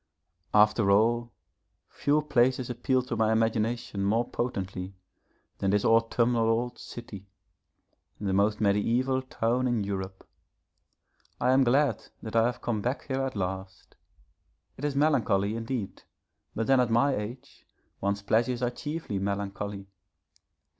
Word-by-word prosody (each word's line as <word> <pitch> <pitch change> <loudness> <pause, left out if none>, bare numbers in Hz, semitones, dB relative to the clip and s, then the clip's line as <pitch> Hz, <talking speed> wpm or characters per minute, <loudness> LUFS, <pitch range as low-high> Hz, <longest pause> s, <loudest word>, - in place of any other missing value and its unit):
_ 105 - +5
After 105 -1 +4
all, 115 +4 +3 0.6
few 150 +1 +1
places 130 -3 +2
appeal 130 +1 0
to 125 -1 -4
my 110 -1 +2
imagination 110 -1 0
more 115 +4 +1
potently 95 -5 -4 0.6
than 100 - 0
this 100 +1 +2
autumnal 115 0 +3
old 120 +2 -1
city 100 -5 -9 0.9
the 100 -2 -1
most 105 +2 +2
mediæval 120 +6 +1
town 120 +3 0
in 120 -4 0
Europe. 95 -1 -5 1.1
I 125 - +3
am 135 +1 +5
glad 130 -1 +2 0.2
that 110 0 -6
I 115 0 +5
have 125 - -4
come 110 -3 -1
back 125 +5 -2
here 135 0 0
at 135 -2 -3
last. 95 0 -5 0.8
It 145 - -5
is 145 -2 -1
melancholy 115 -9 +2
indeed, 115 -2 -4 0.5
but 115 - -1
then 135 +1 +4
at 125 -2 +2
my 130 +5 +3
age 110 +5 -8 0.3
one's 100 0 -1
pleasures 120 +4 +1
are 120 - +1
chiefly 145 -6 -4
melancholy. 100 0 -3
115 Hz, 135 wpm, -28 LUFS, 100-125 Hz, 1.1 s, _